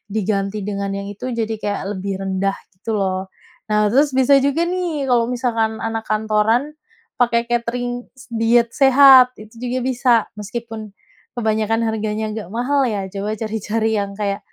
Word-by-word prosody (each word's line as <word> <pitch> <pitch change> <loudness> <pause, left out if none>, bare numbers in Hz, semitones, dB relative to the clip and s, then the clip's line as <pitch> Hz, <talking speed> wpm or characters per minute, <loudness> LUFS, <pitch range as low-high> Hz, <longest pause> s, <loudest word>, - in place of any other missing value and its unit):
diganti 200 -1 -1
dengan 200 0 -3
yang 200 0 -5
itu, 205 +4 -8
jadi 225 0 -1
kayak 205 0 -2
lebih 195 0 -3
rendah 195 +1 -1 0.2
gitu 190 +3 -10
loh. 190 -1 0 0.5
Nah, 210 -1 +2
terus 285 +5 +4
bisa 265 +1 +4
juga 280 +4 +1
nih 350 -6 -2
kalau 240 -2 +3
misalkan 230 -3 0
anak 225 0 -2
kantoran 215 +3 +2 0.6
pakai 235 -1 +3
katering 245 +1 -2
s 260 - -14 0.2
diet 230 +1 +4
sehat, 270 -1 +7 0.2
itu 215 0 -13
juga 250 +1 -1
bisa 255 0 0 0.3
meskipun 225 +2 -6 0.6
kebanyakan 220 -1 0
harganya 220 -1 -2
agak 215 -4 -6
mahal 270 +3 +1
ya, 205 -4 -2
coba 205 +2 -3
cari-cari 220 0 -2
yang 200 -1 -3
kayak 200 -1 -2
225 Hz, 155 wpm, -20 LUFS, 210-245 Hz, 0.6 s, sehat